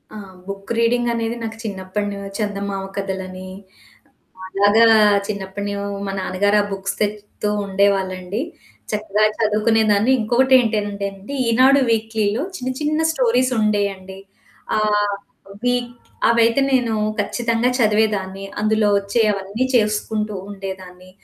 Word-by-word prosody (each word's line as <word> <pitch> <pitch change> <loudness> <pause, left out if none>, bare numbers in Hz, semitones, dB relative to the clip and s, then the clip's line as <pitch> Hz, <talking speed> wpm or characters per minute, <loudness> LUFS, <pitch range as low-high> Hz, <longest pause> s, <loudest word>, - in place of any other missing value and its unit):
ఆ! - - -6 0.3
Book 195 +2 -7
reading 240 +1 +2
అనేది 230 0 -2
నాకు 225 0 -5
చిన్నప్పడును 200 0 -4 0.2
చందమామ 200 -2 -3
కథలని. 185 -1 -5 1.0
అలాగా 205 +4 +4 0.4
చిన్నప్పడూ 200 0 -4 0.3
మా 195 - -3
నాన్నగారు 205 +3 +1
ఆ - - -3
బుక్స్ 195 0 -3
తెత్తూ 210 0 -3 0.2
ఉండేవాళ్ళండి. 190 0 0 0.5
చక్కగా 210 0 0
చదువుకునేదాన్ని. 215 +1 +2
ఇంకొకటేంటనంటే 220 -4 +2
అండి 200 +9 -8
'ఈనాడు' 260 +4 +5
వీక్‌లీలో 220 +1 0
చిన్న 255 +1 -3
చిన్న 305 +1 0
స్టోరీసుండేయండి. 215 -7 0 0.6
ఆహ్, 210 -1 +1 0.5
వీక్‌ 245 -1 0 0.4
అవైతే 230 +3 +3
నేను 240 -4 +2 0.3
ఖచ్చితంగా 230 +3 0
చదివేదాన్ని. 210 -3 +1 0.2
అందులో 215 0 +2
వచ్చే 200 +4 0
అవన్నీ 200 +5 -3
చేసుకుంటూ 215 -1 0 0.2
ఉండేదాన్ని. 185 -2 -8
210 Hz, 100 wpm, -20 LUFS, 195-230 Hz, 1.0 s, ఈనాడు